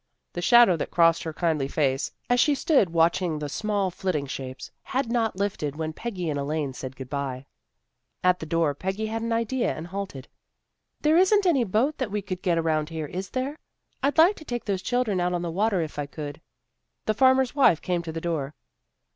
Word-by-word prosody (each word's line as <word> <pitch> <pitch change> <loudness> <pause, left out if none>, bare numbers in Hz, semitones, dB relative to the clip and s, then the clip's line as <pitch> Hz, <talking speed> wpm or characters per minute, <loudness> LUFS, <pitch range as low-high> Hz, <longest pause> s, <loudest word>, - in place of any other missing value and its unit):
The 175 - -4
shadow 235 0 +6
that - - -3
crossed 165 -1 +4
her 160 - -4
kindly 155 -4 0
face, 135 -2 0 0.2
as 245 0 +2
she 295 +2 +4
stood 270 - +3
watching 165 0 +2
the 150 0 -4
small 200 +4 -1
flitting 175 -5 -2
shapes, 130 -1 -7
had 255 -2 -2
not 230 -4 +1
lifted 190 -7 -2
when 160 0 -3
Peggy 190 -4 -4
and 145 -2 -1
Elaine 145 -1 -2
said 130 0 -7
good 130 -1 -8
bye. 135 -2 -4 0.8
At 180 0 +3
the 160 - -6
door 165 -2 +1
Peggy 190 +8 -3
had 225 +1 -3
an 230 0 -2
idea, 230 +2 0
and 160 - -6
halted. 180 -7 -6 0.4
" - - -52
There 305 +2 +4
isn't 400 +2 +4
any 300 -9 +4
boat 240 +10 0
that 260 -5 -1
we 205 0 -3
could 185 -1 -5
get 175 -2 +1
around 155 -2 0
here, 160 -2 -4
is 185 +5 -5
there? 270 +4 -3 0.4
I'd 280 0 0
like 345 +6 +6
to - - -10
take 240 -3 -4
those 195 -3 -1
children 245 -5 0
out 180 0 0
on 175 0 -1
the 170 - -3
water 200 +1 +1
if 150 -1 -7
I 145 - -2
could." 145 +1 -7 0.6
The 215 - +2
farmer's 260 +2 +4
wife 265 - +4
came 180 -2 -1
to 165 -1 -6
the 165 - -4
door. 155 -4 -3
180 Hz, 210 wpm, -26 LUFS, 155-230 Hz, 0.8 s, shadow